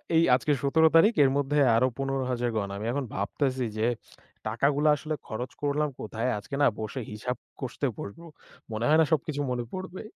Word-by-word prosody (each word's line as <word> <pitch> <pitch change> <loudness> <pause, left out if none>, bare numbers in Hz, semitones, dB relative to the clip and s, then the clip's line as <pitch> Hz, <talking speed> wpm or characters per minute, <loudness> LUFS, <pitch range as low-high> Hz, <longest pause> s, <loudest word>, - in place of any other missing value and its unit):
এই 165 - +6
আজকে 150 - 0
১৭ 160 +3 +4
তারিখ 210 +8 +7
এর 135 - +5
মধ্যে 145 +1 +1 0.2
আরো 130 +3 +4
১৫,০০০ 130 -3 -1
গণ। 100 -2 -1
আমি 105 - -5
এখন 140 0 -2
ভাবতেছি 130 +6 -1
যে, 110 +2 +2 0.6
টাকাগুলো 140 +7 +1
আসলে 155 +2 -4
খরচ 125 +3 -4
করলাম 145 +1 +1
কোথায়? 115 +3 -2
আজকে 120 +7 -6
না 140 - +6
বসে 110 +4 -4
হিসাব 125 +4 -3 0.2
কষতে 135 +1 -2
বসব। 100 +11 -7 0.5
মনে 110 +2 -2
হয় 155 +1 +5
না - - +5
সবকিছু 145 -1 0
মনে 120 -1 -1
পড়বে। 185 0 -6
135 Hz, 175 wpm, -27 LUFS, 120-150 Hz, 0.6 s, তারিখ